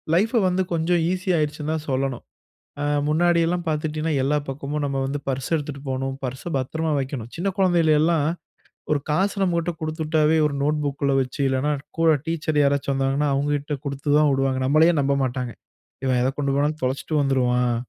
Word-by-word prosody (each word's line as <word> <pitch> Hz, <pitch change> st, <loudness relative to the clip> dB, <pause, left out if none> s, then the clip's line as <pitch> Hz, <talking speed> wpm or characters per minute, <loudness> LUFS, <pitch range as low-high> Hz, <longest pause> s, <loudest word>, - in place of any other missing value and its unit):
லைஃப்ப 225 Hz, +5 st, +2 dB
வந்து, 185 Hz, +1 st, +1 dB
கொஞ்சம் 165 Hz, +1 st, +1 dB
ஈசியாயிருச்சுன்னு 160 Hz, -5 st, -1 dB
தான் 155 Hz, -1 st, -4 dB
சொல்லணும். 130 Hz, -1 st, -1 dB, 0.6 s
அ -, -, 0 dB, 0.2 s
முன்னாடியெல்லாம் 175 Hz, +2 st, +2 dB
பாத்திட்டீங்கன்னா, 155 Hz, 0 st, -1 dB
எல்லா 150 Hz, +2 st, +2 dB
பக்கமும் 145 Hz, +2 st, -3 dB
நம்ம 135 Hz, -1 st, -2 dB
வந்து 140 Hz, +1 st, -3 dB
பர்ஸ் 130 Hz, -1 st, -2 dB
எடுத்துட்டு 145 Hz, -2 st, -5 dB
போணும். 135 Hz, +1 st, -2 dB
பர்ஸ 130 Hz, +1 st, -4 dB, 0.2 s
பத்திரமா 160 Hz, +4 st, -2 dB
வக்கணும். 130 Hz, -4 st, -4 dB
சின்ன 180 Hz, +4 st, -1 dB
குழந்தைகள் 175 Hz, -4 st, +3 dB
எல்லாம், 155 Hz, -2 st, +2 dB, 0.6 s
ஒரு 150 Hz, -, +3 dB
காசு 195 Hz, +6 st, +1 dB
நம்மகிட்ட 170 Hz, -1 st, 0 dB
குடுத்துட்டாவே 155 Hz, 0 st, +1 dB
ஒரு 145 Hz, -, -4 dB
நோட்புக்ல 145 Hz, -2 st, 0 dB
வச்சு, 130 Hz, +3 st, -4 dB
இல்லன்னா 135 Hz, +3 st, +1 dB, 0.3 s
கூட 165 Hz, -1 st, +4 dB, 0.2 s
டீச்சர் 155 Hz, -2 st, 0 dB
யாராச்சும் 140 Hz, -1 st, +1 dB
வந்தாங்கன்னா, 135 Hz, +2 st, +1 dB
அவுங்ககிட்ட 145 Hz, +1 st, -1 dB
குடுத்து 140 Hz, +1 st, -4 dB
தான் 150 Hz, -1 st, +4 dB
விடுவாங்க. 135 Hz, -1 st, 0 dB
நம்மளயே 160 Hz, +4 st, +5 dB
நம்ப 140 Hz, 0 st, +1 dB
மாட்டாங்க. 125 Hz, -1 st, -3 dB, 0.5 s
இவன் 130 Hz, -1 st, +2 dB
எத 130 Hz, -, +2 dB
கொண்டு 140 Hz, -1 st, 0 dB
போனாலும், 150 Hz, +2 st, 0 dB
தொலச்சுட்டு 135 Hz, +4 st, -2 dB
வந்துருவான். 125 Hz, -3 st, +1 dB
150 Hz, 160 wpm, -23 LUFS, 135-160 Hz, 0.6 s, நம்மளயே